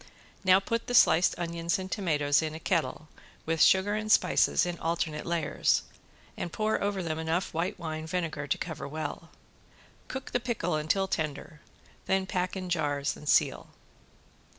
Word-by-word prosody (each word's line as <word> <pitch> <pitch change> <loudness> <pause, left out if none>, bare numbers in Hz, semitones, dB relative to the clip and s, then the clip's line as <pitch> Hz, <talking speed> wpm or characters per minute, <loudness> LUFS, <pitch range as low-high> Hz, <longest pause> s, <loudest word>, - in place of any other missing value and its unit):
Now 185 0 +6
put 230 +4 -3
the 245 - -1
sliced 175 -5 +5
onions 170 +2 -1
and 190 0 -6
tomatoes 150 -7 +2
in 155 -1 -3
a - - -6
kettle 165 -2 -1 0.4
with 160 -1 0
sugar 190 +2 +5
and 215 0 -1
spices - - +4
in 175 -1 -4
alternate 165 -2 -2
layers, 170 -2 +1 0.5
and 175 - -4
pour 215 +3 0
over 200 -2 -1
them 160 -1 -3
enough 160 +3 -1
white 175 +5 -2
wine 160 -2 -5
vinegar 165 -4 -3
to - - 0
cover 160 -5 -5
well. 155 +2 -5 0.8
Cook 265 0 -6
the 245 - +1
pickle 230 -8 -2
until 155 +6 +1
tender, 155 -2 -4 0.5
then 190 0 +2
pack 185 -1 -2
in 185 -1 -4
jars 145 -5 -1
and 150 - -7
seal. - - +2
170 Hz, 160 wpm, -29 LUFS, 155-190 Hz, 0.8 s, Now